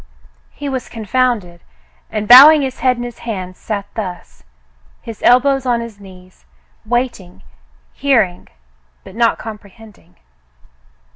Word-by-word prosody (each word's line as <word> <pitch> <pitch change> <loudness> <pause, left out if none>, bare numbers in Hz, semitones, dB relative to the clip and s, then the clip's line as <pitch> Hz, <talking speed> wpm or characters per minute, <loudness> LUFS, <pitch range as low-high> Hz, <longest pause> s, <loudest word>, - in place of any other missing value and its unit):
He 290 - -8
was 260 -2 -5
confounded, 220 -5 -2 0.5
and 215 -1 -4
bowing 285 +5 +9
his 260 -1 -5
head 250 0 +1
in 240 - -5
his 240 -1 -9
hands 185 -5 -7
sat 205 -2 -5
thus 185 -6 -8 0.3
— - - -35
his 230 -2 -10
elbows 265 +1 +3
on 240 -1 +1
his 230 -3 -9
knees 185 -2 -17 0.2
— - - -40
waiting, 235 -6 -3 0.5
hearing, 230 -11 0 0.6
but - - -13
not 230 0 +1
comprehending. 215 - -13
230 Hz, 130 wpm, -16 LUFS, 195-250 Hz, 0.6 s, bowing